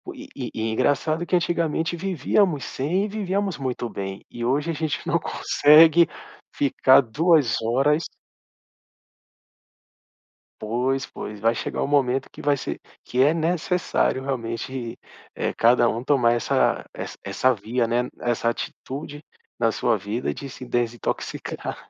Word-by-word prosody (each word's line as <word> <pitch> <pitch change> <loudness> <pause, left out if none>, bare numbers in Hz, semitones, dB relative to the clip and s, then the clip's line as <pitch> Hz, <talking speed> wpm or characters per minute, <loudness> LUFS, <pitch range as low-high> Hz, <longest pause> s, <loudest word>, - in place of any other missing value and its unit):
e - - -7
e 110 - -4
engraçado 150 +7 +1
que 180 - +1
antigamente 170 -1 0
vivíamos 180 -3 +1
sem, 170 +12 -1
e - - -3
vivíamos 200 -3 -2
muito 125 -3 -3
bem. 95 -1 -6
E 120 0 -5
hoje 145 +6 0
a - - 0
gente 155 -1 -3
não - - +2
consegue 160 +3 +5 0.5
ficar 135 -1 +5
2 145 - +2
horas 135 +7 +2 2.6
Pois, 125 +5 -1
pois. 105 -1 -8
Vai 115 +2 +2
chegar - - -3
o - - 0
momento 135 -2 +1
que - - -15
vai 145 0 +2
ser 140 - -5 0.2
que 125 - -4
é 145 +4 +5
necessário 170 -4 0
realmente, 120 -1 -4 0.4
eh, - - -2
cada 120 0 +4
um 115 +2 -3
tomar 125 -4 +3
essa 120 - +1
essa - - -7
essa 130 - +2
via, 115 +3 -1
né. 120 +1 +1
E - - -8
essa 120 -1 0
atitude 145 +4 -6 0.3
na - - +3
sua - - +1
vida, 110 +5 -3
de 140 - -7
se 130 - -10
desintoxicar. 120 -2 -3
135 Hz, 140 wpm, -24 LUFS, 120-160 Hz, 2.6 s, consegue